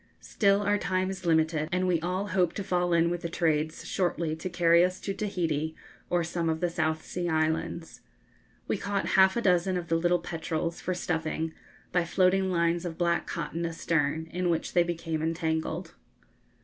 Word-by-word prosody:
Still, 200 -1 +2
our 205 +1 +2
time 185 0 0
is 185 -2 -6
limited, 160 -1 +2
and 185 +1 +1
we 175 -2 +2
all 185 +4 -2
hope 180 -2 +2
to 200 - -4
fall 180 -1 0
in 170 0 +3
with 175 -1 -2
the 170 - -3
trades 155 -2 0
shortly 170 -3 -1
to 165 +3 -5
carry 170 -1 +4
us 180 +1 0
to 195 - -3
Tahiti 160 -7 -2 0.3
or 175 -1 +2
some 165 0 -1
of 160 0 0
the 175 0 0
South 160 -2 -1
Sea 175 -1 -3
islands. 160 +1 -1 0.7
We - - -1
caught 200 -1 -1
half 190 +2 +5
a 235 - 0
dozen 180 0 +3
of 170 -1 -5
the 165 - +2
little 175 +1 +3
petrels, 165 -1 -3
for 185 - -2
stuffing, 160 -1 -2 0.4
by 175 - +2
floating 190 +2 +2
lines 170 0 +1
of 170 -2 -5
black 170 -1 +1
cotton 170 +1 -3
astern, 160 -2 0
in 180 0 -1
which 165 -1 -1
they 175 - +5
became 165 -2 -2
entangled. 160 +1 -2
170 Hz, 185 wpm, -28 LUFS, 160-180 Hz, 0.7 s, half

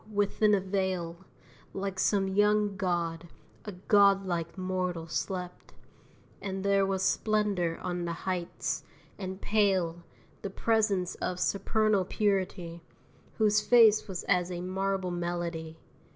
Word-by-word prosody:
within 205 +1 +2
a - - +1
vale, 185 -3 -2 0.6
Like 195 -1 -3
some 195 -1 +2
young 205 +1 +2
god, 175 -3 -2 0.4
a 210 - -5
godlike 195 -3 +2
mortal 185 -2 -2
slept; 180 +2 -4 0.7
And 195 0 -4
there 200 -1 +3
was 190 -1 -1
splendor 200 -5 +1
on 175 -1 -2
the 170 - -2
heights, 180 -2 -2 0.4
and 190 -1 -5
pale 190 -6 +1 0.4
The 200 - -4
presence 200 -3 +1
of 180 0 -2
supernal 205 0 +1
purity, 185 -4 -1 0.6
Whose 215 -1 +3
face 225 -3 +5
was 190 -3 -5
as 180 -2 +1
a 175 -1 -4
marble 190 0 -2
melody. 170 -2 -4
190 Hz, 120 wpm, -29 LUFS, 175-200 Hz, 0.7 s, face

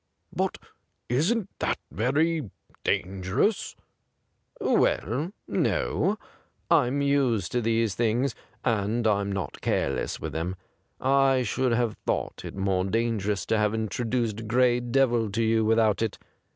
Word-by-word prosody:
' - - -30
But - - -1 0.5
isn't 180 - +1
that - - 0
very 140 - +1 0.3
dangerous 95 - 0 0.3
?' - - -49
' - - -31
Well, 140 - +1 0.2
no; 205 +3 +1 0.5
I'm 135 +4 +3
used 135 -9 +1
to 125 - +1
these 115 -2 +1
things, 120 +4 +1 0.3
and 115 0 +1
I'm 100 -2 +2
not 95 -7 -4
careless - - -1
with - - -5
them. 85 +3 -2 0.4
I 135 -1 +3
should 125 +2 0
have 115 -2 0
thought - - -1
it - - -7
more 95 -1 0
dangerous 105 -1 0
to 110 - +1
have 105 0 +1
introduced 115 0 -2
Gray 120 +1 +3
Devil 120 -2 +2
to 115 +2 +1
you 110 0 +3
without 110 -1 +3
it. 110 -3 -1
115 Hz, 135 wpm, -27 LUFS, 105-130 Hz, 0.5 s, I'm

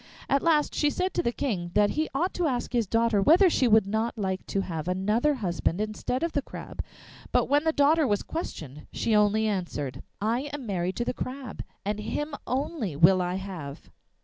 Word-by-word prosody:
At 275 0 +2
last 310 -3 +2
she 295 - +2
said 370 +5 -1
to - - +1
the 235 - 0
King 200 -10 -2
that 205 0 +4
he 310 +1 -1
ought 350 +7 0
to 350 -3 0
ask 250 -3 -2
his 235 -4 +1
daughter 230 -1 +2
whether 345 - +6
she 260 - +3
would 220 -2 +5
not 220 +4 -1
like 190 -2 -2
to 195 - 0
have 165 -4 -4
another 210 +10 +1
husband 180 -5 -1
instead 215 +6 -2
of 335 - 0
the 285 - 0
Crab? - - -7 0.5
But - - +3
when 290 +2 +2
the 320 - +4
daughter 300 0 +4
was 205 -3 +1
questioned 150 - -6
she 225 - 0
only 210 +1 +3
answered: 170 -10 -3 0.2
'I 235 +7 -1
am 285 -3 -5
married 185 -3 -2
to 240 - -2
the - - -1
Crab, 255 -3 -6 0.2
and 210 +1 -1
him 295 +8 -3
only 255 - -2
will 180 +5 +5
I 180 0 -1
have. 180 -8 -7
220 Hz, 200 wpm, -27 LUFS, 190-285 Hz, 0.5 s, whether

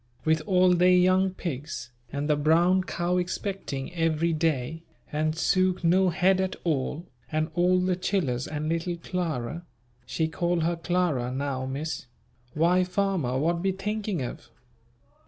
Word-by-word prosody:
"with 160 0 +3
all 185 -1 +5
they 180 +1 +5
young 185 +1 +4
pigs, 150 -8 -5 0.2
and 140 +1 -2
the 150 - +3
brown 170 +5 +3
cow 175 0 -1
expecting 180 -5 -3
every 165 0 +1
day, 155 -1 -1 0.3
and 155 +1 0
Suke 185 +1 +2
no 185 +2 +4
head 185 +2 +3
at 190 0 -2
all, 155 +1 -1 0.3
and 155 0 -1
all 180 +2 +3
the 180 0 +1
chillers 165 -10 -1
and 155 0 -3
little 170 +2 -1
Clara" 170 -4 -3 0.4
she 160 - 0
call 175 +1 0
her 170 +2 +1
"Clara" 165 -7 0
now, 130 -1 -2
Miss, 145 +2 -4 0.5
"why 175 +4 +3
farmer 180 -9 0
what 170 +4 +1
be 190 +1 +1
thinking 200 -3 -3
of?" 120 - -7
170 Hz, 145 wpm, -27 LUFS, 155-180 Hz, 0.5 s, all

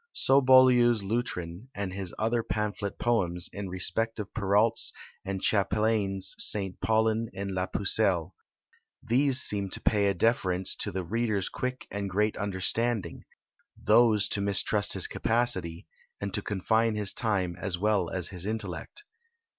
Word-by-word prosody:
So 135 +1 +3
Boileau's 125 -4 +5
Lutrin, 95 -3 -4
and 100 -2 -4
his 95 -2 -2
other 115 +2 0
pamphlet 105 -2 -4
poems, 90 -7 0
in 100 0 -6
respect 95 +5 -2
of 105 -3 -7
Perrault's 105 +4 +2 0.3
and 95 -1 -5
Chapelain's 100 -2 +1
St. 95 -3 0
Paulin 110 0 0
and 100 0 -5
la 95 0 -2
Pucelle. 95 -4 0 0.7
These 130 +2 +4
seem 100 -4 +3
to - - 0
pay 105 -2 +1
a 100 - 0
deference 95 -2 +1
to 105 - -1
the 95 0 -4
reader's 105 +1 -2
quick 125 0 -5
and 100 -1 -4
great 105 +3 0
understanding; 105 +3 -2 0.5
those 110 -1 +3
to 100 - 0
mistrust 100 +1 +1
his - - +2
capacity, 95 -8 -1 0.3
and 100 -1 -5
to 105 - -1
confine 110 +3 0
his 105 -2 +2
time 95 -7 +1
as 95 -4 -1
well 100 -3 0
as 90 -3 -2
his 90 0 -4
intellect." 110 - -5
100 Hz, 145 wpm, -27 LUFS, 95-115 Hz, 0.7 s, Boileau's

